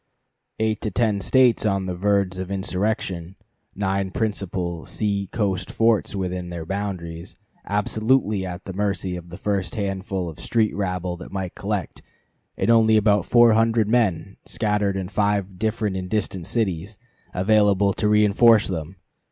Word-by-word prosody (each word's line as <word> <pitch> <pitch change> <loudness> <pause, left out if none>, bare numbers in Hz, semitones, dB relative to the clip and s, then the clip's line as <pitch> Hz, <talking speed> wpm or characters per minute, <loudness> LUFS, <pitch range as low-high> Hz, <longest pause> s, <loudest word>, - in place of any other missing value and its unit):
Eight 110 -1 0
to 110 - -2
ten 105 0 0
States 130 +2 +4
on 100 -3 0
the 90 - -3
verge 95 0 0
of 95 0 -4
insurrection 95 -2 -2 0.4
nine 95 -1 -1
principal 90 -5 -3
sea 100 -2 -2
coast 95 -5 -1
forts 115 -2 +1
within 90 -2 -3
their 85 -2 -6
borders, 90 -3 -5 0.3
absolutely 105 0 +1
at 90 0 -6
the 95 - -6
mercy 95 -2 -1
of 85 -1 -9
the 85 - -9
first 100 -3 -2
handful 95 -2 -3
of 80 - -8
street 110 -2 0
rabble 90 -3 -2
that - - -10
might 95 -2 -4
collect, 100 -4 -4 0.6
and 100 +5 +2
only 110 -1 +5
about 105 -3 +2
four 120 -2 +6
hundred 115 -1 +3
men, 100 -5 0
scattered 105 -3 0
in 95 -1 -3
five 100 -2 -1
different 110 -2 -1
and 90 -1 -4
distant 95 -5 -2
cities, 100 -3 -2 0.4
available 100 0 +3
to 105 - -1
reënforce 105 +1 +5
them! 85 0 -4
100 Hz, 150 wpm, -23 LUFS, 90-105 Hz, 0.6 s, four